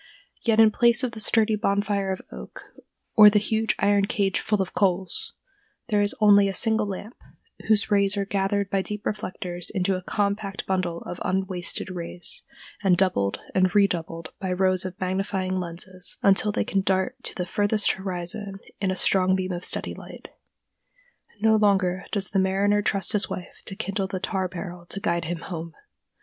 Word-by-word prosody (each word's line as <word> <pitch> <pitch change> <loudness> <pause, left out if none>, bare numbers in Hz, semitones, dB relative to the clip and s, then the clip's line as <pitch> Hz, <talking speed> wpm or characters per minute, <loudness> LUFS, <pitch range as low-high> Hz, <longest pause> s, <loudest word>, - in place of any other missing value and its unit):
Yet 225 -2 +2
in 220 -1 +7
place 235 +3 +3
of 250 - 0
the 225 - -9
sturdy 220 0 +2
bonfire 200 -1 0
of 190 - -5
oak, 65 0 -10 0.5
or 210 -1 +9
the 210 - +2
huge 220 +1 +1
iron 200 0 +3
cage 200 -2 0
full 210 -1 0
of 190 -1 -2
coals, 185 -2 0 0.6
there 210 -2 +2
is 205 +5 +1
only 205 -2 +6
a 195 - -3
single 220 -1 +2
lamp, 205 +4 -6 0.5
whose 215 0 +2
rays 200 0 +3
are 200 - 0
gathered 200 0 -1
by 195 - +2
deep 210 +2 -6
reflectors 180 -3 -3
into 190 -1 0
a 185 - -4
compact 200 +1 -2
bundle 180 -3 -1
of 175 - -7
unwasted 185 -1 -1
rays, 180 - -2 0.4
and 185 -3 +4
doubled 135 - +1
and 185 +1 +2
redoubled 165 -5 0
by 190 -2 -3
rows 185 0 +2
of 185 0 -6
magnifying 185 0 -1
lenses 180 +1 -6
until 200 +2 +4
they - - -1
can 195 - 0
dart 190 +6 0
to - - -4
the 180 -4 -2
furthest 205 +3 +1
horizon 190 +1 -4 0.2
in 195 - 0
a 185 - 0
strong 185 0 +3
beam 185 0 -2
of 175 0 -4
steady - - -1
light. - - -11 1.1
No 220 0 +5
longer 195 -3 +2
does 200 -2 -2
the 195 - +2
mariner 200 +2 +2
trust 195 -3 0
to 215 - +2
his - - -1
wife 180 - -7
to 195 - -4
kindle 195 -2 -2
the 190 -1 -4
tar 190 0 -1
barrel 175 -1 -8
to 195 - -4
guide 170 -3 -1
him 165 0 -4
home. 165 -2 -7
195 Hz, 180 wpm, -25 LUFS, 185-205 Hz, 1.1 s, or